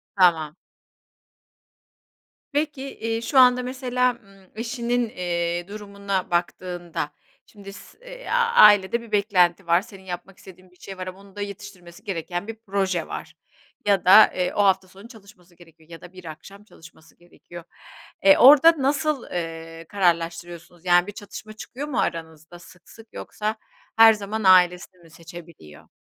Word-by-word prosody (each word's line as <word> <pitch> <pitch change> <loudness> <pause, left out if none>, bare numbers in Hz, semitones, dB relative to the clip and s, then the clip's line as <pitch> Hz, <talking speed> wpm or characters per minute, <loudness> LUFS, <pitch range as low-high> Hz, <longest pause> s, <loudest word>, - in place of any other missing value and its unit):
Tamam. 165 -5 +2 2.0
Peki, 290 -2 -3
iii, 225 0 -3
şu 265 +3 +2
anda 250 0 +5
mesela, 250 -1 -1
ımm, 195 -1 -21
eşinin, 240 0 -2
eee, 175 -2 -3
durumuna 200 -2 -5
baktığında 175 -2 -3 0.3
şimdi 200 -2 -13
s - - -15
eee, - - -12 0.3
ailede 205 +2 +6
bir 230 -2 -14
beklenti 195 -4 +1
var, 170 +2 +3
senin 195 -3 -15
yapmak 185 +1 -9
istediğin 185 -1 -17
bir - - -25
şey 195 -1 -10
var 185 0 -7
ama 185 +1 -9
onun 200 0 -18
da 205 - -7
yetiştirmesi 200 -2 -10
gereken 175 +1 -5
bir 225 - -6
proje 190 -4 -2
var - - -8 0.5
ya 200 -3 +1
da, 210 +4 +8
eee, 180 -1 -2
o 205 - +1
hafta 190 -1 +2
sonu 195 +4 -15
çalışması 200 -6 -18
gerekiyor 165 -2 -21
ya 165 -1 -12
da 180 - -14
bir 185 -1 -13
akşam 195 +6 -12
çalışması 165 -5 -19
gerekiyor. 175 0 -14 0.6
E, 195 0 +6
orada 295 +5 +8
nasıl, 280 0 -1
eee, 165 -1 -6
kararlaştırıyorsunuz 170 -2 -2
yani 175 0 +3
bir - - -6
çatışma 205 +1 -11
çıkıyor 260 +6 -8
mu 275 - -3
aranızda 160 +1 -5
sık 180 0 -18
sık 225 -1 -17
yoksa 215 +1 -5 0.4
her 225 0 +8
zaman 210 +1 -5
ailesini 180 -1 +3
mi 165 - -19
seçebiliyor? 165 - -14
190 Hz, 150 wpm, -23 LUFS, 175-215 Hz, 2.0 s, da